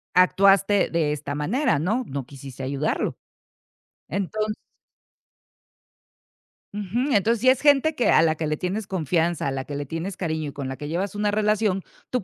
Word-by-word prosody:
actuaste 195 +2 +4
de 160 -3 +1
esta 145 -1 -4
manera, 195 - +1
¿no?, 205 - 0
no 135 -1 -4
quisiste 135 -1 -10
ayudarlo. 140 +3 -1 0.9
Entonces 210 +4 -2 2.2
Ujú, 225 +7 -1
entonces 215 +2 +2
si 255 - +5
es 260 - +3
gente 290 +1 +4
que 245 - +1
a - - +6
la 160 -1 +3
que 155 0 -3
le 155 0 -1
tienes 195 +5 -3
confianza, 170 -2 0
a - - 0
la 135 0 -3
que 145 - -7
le 145 0 -3
tienes 165 +6 -5
cariño 160 -4 -2
y - - -11
con 140 -2 -5
la 135 - -4
que 145 +2 -7
llevas 190 +5 -2
una 205 0 0
relación, 210 -2 +1 0.3
tú 250 -6 -1
180 Hz, 170 wpm, -24 LUFS, 150-210 Hz, 2.2 s, a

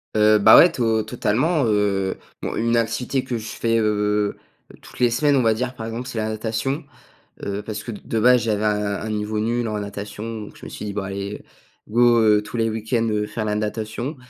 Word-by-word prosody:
Heu, 105 0 +5
bah, 110 +2 +8
ouais 175 - +8
to 115 -7 +1
totalement, 125 +8 0
heu, 100 -3 +1 0.2
bon - - -3
une 115 +1 +1
activité 115 +3 0
que 125 -2 -3
je 110 - -7
fais, 115 0 0
heu, 105 -1 +1 0.5
toutes - - -14
les 125 - +4
semaines, 140 +4 +2
on - - +3
va 115 -1 +3
dire 125 +3 -3
par 110 -2 -7
exemple, 115 +2 -5
c'est 120 -3 -6
la 110 - -1
natation, 115 +7 -2 0.6
heu, 100 +1 -3
parce 105 0 -6
que 120 - -6
de 110 +1 -3
base, 125 +1 +5
j'avais 110 -2 0
un 105 -1 0
un 110 - -4
niveau 105 0 -2
nul 120 +1 0
en 110 - -2
natation, 105 +2 -6
donc - - -12
je - - -12
me - - -7
suis - - -7
dit: 100 - -4
«Bah, 100 -2 -3
allez 100 +1 -5 0.5
go, 120 +1 +4
heu, 105 -1 +4
tous 105 - -9
les 115 -1 +1
week-ends, 115 +1 -1
heu, 105 -1 0
faire 110 - -4
la 105 -1 -1
natation.» 110 +6 -3
110 Hz, 220 wpm, -22 LUFS, 105-120 Hz, 0.6 s, bah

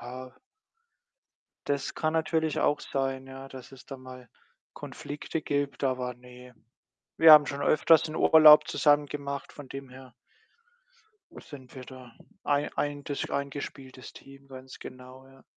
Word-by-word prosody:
Ja 125 +1 -10 1.3
Das 140 -1 -2
kann 155 0 -2
natürlich 160 -1 -1
auch 145 - +1
sein, 135 -1 -4
ja, 135 0 -10
dass 130 -1 -12
es 130 -2 -15
da 135 - -8
mal 130 -1 -13 0.5
Konflikte 150 +2 -7
gibt, 145 -1 -3
aber 125 -2 -2
ne. 125 0 -16 0.6
Wir 160 -1 +8
haben 150 -1 +8
schon 140 0 -5
öfters 155 +1 +4
'n 155 - -7
Urlaub 155 -1 +7
zusammen 145 -1 +2
gemacht, 140 -1 -6
von 145 - -11
dem 135 0 -9
her 130 0 -14 1.3
sind 130 -4 -13
wir 130 - -9
da 130 -2 -13 0.3
ein 145 0 -1
eintes 145 -1 -3
eingespieltes 140 -2 -6
Team, 135 0 -16
ganz 130 0 -12
genau, 130 +1 -12
ja. 135 0 -20
135 Hz, 140 wpm, -27 LUFS, 130-145 Hz, 1.3 s, Wir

